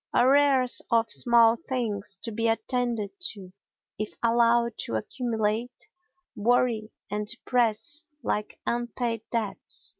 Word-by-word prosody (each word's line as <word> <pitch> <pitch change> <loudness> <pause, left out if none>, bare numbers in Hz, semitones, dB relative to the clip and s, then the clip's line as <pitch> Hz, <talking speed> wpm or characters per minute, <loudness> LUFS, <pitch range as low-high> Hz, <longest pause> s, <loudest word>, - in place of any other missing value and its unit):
Arrears 265 -1 +4
of 230 -1 +2
small 235 -1 +5
things 210 -6 -3
to 230 - -3
be 230 +1 0
attended 230 -1 -1
to, 200 - -5 0.5
if 215 - -4
allowed 235 0 +3
to 115 - -3
accumulate, 225 - -2 0.5
worry 230 0 +1 0.2
and 210 0 -2
depress 240 +5 0 0.2
like 210 0 -2
unpaid 240 -1 -1
debts. 225 -4 -3
230 Hz, 110 wpm, -27 LUFS, 215-245 Hz, 0.5 s, small